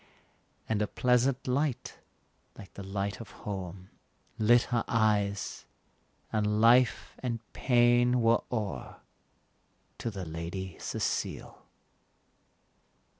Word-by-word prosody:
And 110 -2 0
a 105 - +1
pleasant 125 +3 +1
light, 135 +1 -1 0.6
like 100 - -12
the - - -8
light 100 +3 -3
of 115 - -10 0.2
home, 95 -2 -6 0.5
Lit 120 +2 +5
her 115 - +2
eyes, 105 -3 0 0.7
and 105 0 +1
life 120 +3 +4
and 120 -2 -2 0.2
pain 120 0 +4
were 115 0 +4
o'er 110 -5 -4 1.0
To - - -2
the 95 -4 -6
Lady 85 +3 -5
Cecile. - - -3
110 Hz, 100 wpm, -30 LUFS, 100-120 Hz, 1.0 s, Lit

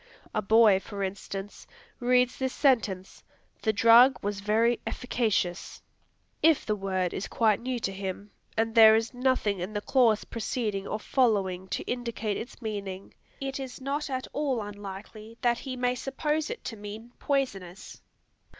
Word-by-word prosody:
A 215 - 0
boy, 215 -1 +5
for 200 0 -6
instance, 195 +1 -6 0.3
reads 250 0 +2
this 260 -1 -1
sentence. 215 -9 +1 0.4
"The 220 - +2
drug 230 +5 +6
was 205 0 -2
very 225 +4 +2
efficacious." 215 -8 -2 0.6
If 320 -2 +4
the 215 - 0
word 190 -3 -1
is 195 - -4
quite 220 -3 +2
new 255 +1 -3
to 195 - -1
him, 195 +1 -6 0.3
and 225 0 +1
there 220 -1 +8
is 225 +3 -1
nothing 245 -6 +1
in 185 +4 -4
the 205 - -1
clause 230 -3 +3
preceding 220 -4 -3
or 215 - -3
following 195 -7 +1
to 190 - -3
indicate 230 -4 -3
its 245 +1 -8
meaning, 200 -3 -5 0.3
it 270 -1 -4
is 260 -1 -7
not 280 +3 -3
at 260 -1 -3
all 280 -5 0
unlikely 205 +2 -9
that 240 -1 +2
he 265 -2 -5
may 250 0 +1
suppose 300 +5 -2
it 480 - -6
to 230 - -5
mean 215 +3 -9
"poisonous." 200 -10 -3
225 Hz, 155 wpm, -28 LUFS, 200-250 Hz, 0.6 s, there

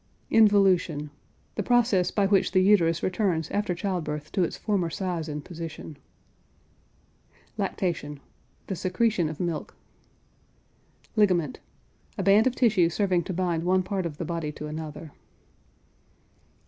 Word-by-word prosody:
INVOLUTION. 190 -8 +3 0.4
The - - -2
process 225 -5 +3
by 205 - +1
which 195 -2 +2
the 185 - +5
uterus 170 -5 +3
returns 180 -4 0
after 205 -3 -1
child 185 -1 -2
birth 150 0 -5
to 185 - +1
its - - -3
former 195 -6 0
size 170 -2 -3
and 150 -1 -5
position. 165 -3 -8 1.6
LACTATION. 150 -5 -3 0.5
The 190 - -4
secretion 185 -1 0
of 155 - -7
milk. 170 -3 -3 1.4
LIGAMENT. 180 - +2 0.6
A - - -1
band 205 +4 +5
of 255 - 0
tissue 210 -9 +3
serving 180 -1 0
to 185 - -4
bind 175 -2 0
one 185 +1 +2
part 190 -2 -2
of 150 -3 -9
the 170 - -4
body 165 -2 -3
to 150 - -7
another. 155 0 -7
180 Hz, 135 wpm, -26 LUFS, 160-200 Hz, 1.6 s, the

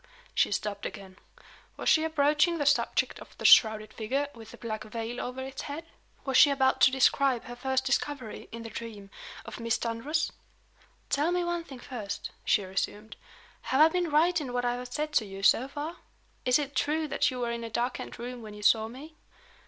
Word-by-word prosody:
She - - +2
stopped 205 0 -2
again. 190 -1 -11 0.6
Was - - -5
she 315 - +5
approaching 310 +2 +2
the 290 - -1
subject 285 +1 +2
of - - -14
the - - -7
shrouded 215 -1 +6
figure, 270 +6 -1
with 225 -2 -12
the - - -12
black 215 -2 -5
veil 225 +2 -5
over 250 +1 -5
its 265 0 -6
head? 300 +3 -6 0.4
Was 270 -2 +2
she 290 - +8
about 265 -1 +2
to - - +8
describe 265 -1 +3
her 245 -1 -8
first 265 +1 -1
discovery, 270 -4 -2
in 230 0 -7
the 225 - -8
dream, 210 -4 -8 0.3
of - - -8
Miss 230 -1 0
Dunross? 275 +8 -1 0.8
"Tell 300 +5 +2
me 355 0 +1
one 345 -1 -2
thing 270 -5 -10
first," 240 -5 -6
she 205 - +2
resumed. 205 +3 -3 0.5
"Have 265 - +2
I 310 +1 +8
been 350 0 0
right 320 +3 +3
in 255 -4 -5
what 245 0 0
I 240 - +1
have 245 0 -6
said 300 +2 -2
to 225 - +3
you, 195 0 -8
so 250 +6 +5
far? 300 +5 -6 0.5
Is 250 0 +5
it 285 -2 -4
true 305 +4 0
that 290 -1 +1
you 255 -2 -5
were 240 -1 -1
in 235 0 -4
a 230 - -5
darkened 240 +3 -3
room 245 +1 -6
when 215 -2 -9
you 210 - -10
saw 220 +1 +4
me?" 275 +7 -11
250 Hz, 205 wpm, -29 LUFS, 225-290 Hz, 0.8 s, she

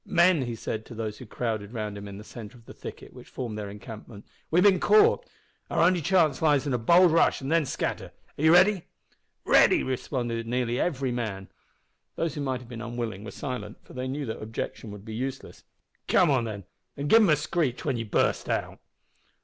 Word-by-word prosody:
"Men," 175 -3 +4
he 120 - -3
said 110 -1 -4
to 115 - -10
those 110 -1 -4
who 125 - -10
crowded 110 -2 -3
round 105 -3 -4
him 100 0 -8
in 100 -1 -8
the 105 - -9
centre 110 +1 -10
of 115 - -20
the - - -11
thicket - - -10
which - - -13
formed 120 -4 -5
their 105 -1 -5
encampment, 105 +1 -10 0.2
"we've 175 +3 +4
bin 195 -3 +5
caught. 215 - +4 0.4
Our - - +2
only 180 0 +3
chance 160 -5 +2
lies 150 -3 +3
in 140 - -1
a 125 - +1
bold 170 +9 +5
rush 165 - +3
and 135 +2 -4
then 165 -3 +3
scatter. - - -3 0.3
Are - - -7
you 160 - +6
ready?" 185 +1 +5 0.6
"Ready!" - - +5
responded 120 -3 -3
nearly 120 0 -1
every 135 -7 0
man. 105 -6 -4 0.7
Those 165 -3 -1
who 145 - -5
might 130 -2 -2
have 125 - -13
been 120 -2 -8
unwilling 115 -4 -4
were 110 - -7
silent, 110 -6 -6
for - - -15
they 130 0 -4
knew 140 +2 -3
that 110 - -5
objection 110 0 -5
would 105 0 -10
be 110 - -7
useless. 130 +4 -6 0.4
"Come 175 -5 +4
on, 130 -4 +2
then, 105 -3 -6 0.3
an' 140 - -3
give 225 +10 +6
them 205 - +4
a 155 - +6
screech 150 -3 -1
when 135 -5 0
ye 115 - -2
burst 105 - 0
out!" - - -2
125 Hz, 215 wpm, -27 LUFS, 110-155 Hz, 0.7 s, you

